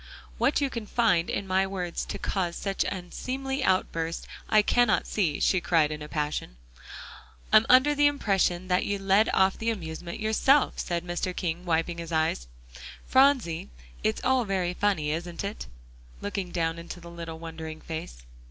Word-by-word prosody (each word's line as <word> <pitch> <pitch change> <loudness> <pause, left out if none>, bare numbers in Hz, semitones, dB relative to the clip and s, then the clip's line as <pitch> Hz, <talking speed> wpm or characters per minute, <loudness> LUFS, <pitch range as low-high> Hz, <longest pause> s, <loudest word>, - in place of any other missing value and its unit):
"What 270 +5 +2
you 275 -2 0
can 230 -3 -5
find 190 -9 +2
in 200 - -2
my 190 0 +1
words 180 -3 -3
to - - -5
cause 175 -3 -2
such 195 -1 -1
an - - -3
unseemly 265 +9 -4
outburst, 165 -3 0 0.2
I 215 -1 +5
cannot 240 0 +3
see," 170 -9 0
she 185 - +2
cried 160 -3 +2
in 150 0 -5
a 150 - -7
passion. 150 - -3 1.0
"I'm 215 - +7
under 260 +4 +6
the 290 0 +4
impression 195 -9 +1
that 180 0 +2
you 205 - -1
led 195 +2 +3
off 190 0 +3
the 225 - 0
amusement 170 -4 -5
yourself," 235 +6 +3
said 175 0 -2
Mr. 180 +1 -3
King, 175 0 -3
wiping 170 0 0
his 170 0 -6
eyes. 160 - 0 0.6
"Phronsie, 260 - +3 0.3
it's 110 - 0
all 260 -1 +3
very 190 -4 -1
funny, 180 -7 0
isn't 170 +3 -4
it?" 200 +2 -5 0.5
looking 200 -2 -4
down 165 -1 -1
into 170 +1 -8
the 170 0 -11
little 165 -1 -7
wondering 160 -1 -7
face. 155 - -7
180 Hz, 170 wpm, -27 LUFS, 165-215 Hz, 1.0 s, I'm